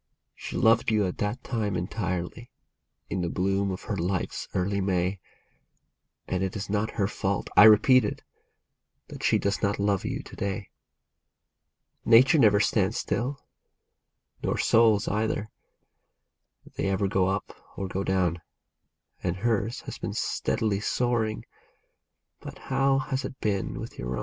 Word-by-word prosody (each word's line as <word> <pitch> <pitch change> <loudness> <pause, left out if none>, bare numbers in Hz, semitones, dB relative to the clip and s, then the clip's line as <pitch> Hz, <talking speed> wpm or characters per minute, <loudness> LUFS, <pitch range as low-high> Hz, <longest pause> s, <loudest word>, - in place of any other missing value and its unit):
She - - -6
loved 115 +1 +4
you 105 -2 +2
at 90 - -4
that 105 +5 -2
time 105 -5 -2
entirely, 95 +4 -3 0.6
in 95 - -2
the 85 - -1
bloom 95 +2 0
of 95 0 -5
her 105 - -3
life's 90 0 -2
early 100 +2 0
May, 95 0 0 1.1
And 90 - -1
it 95 -1 -2
is 100 -1 -5
not 105 +1 -1
her 100 - +2
fault, 100 -2 -2
I 105 - +9
repeat 110 +4 +7
it, 105 - -4 0.9
that - - -9
she - - +3
does 100 0 -1
not 100 -1 +1
love 100 -1 0
you - - -3
to - - -12
day. 100 0 -4 1.3
Nature 130 +8 +6
never 105 -5 +5
stands 105 0 +1
still, 135 +4 -3 1.0
nor - - -1
souls 110 -3 +4
either. 110 0 -1 1.2
They 95 - -1
ever 95 +1 +1
go 95 -1 +1
up 95 +1 -2 0.2
or 95 - -3
go 95 +1 -3
down; 90 -3 0 0.8
And 90 -1 -1
hers 115 +2 -1
has - - -8
been - - -4
steadily 105 -3 -1
soaring, 115 -1 -1 0.5
— - - -55
but - - -9 0.2
how 135 0 +3
has 130 0 -2
it 130 - -7
been 100 -3 -2
with - - -8
your 60 0 -3
own - - -2
100 Hz, 150 wpm, -27 LUFS, 95-110 Hz, 1.3 s, I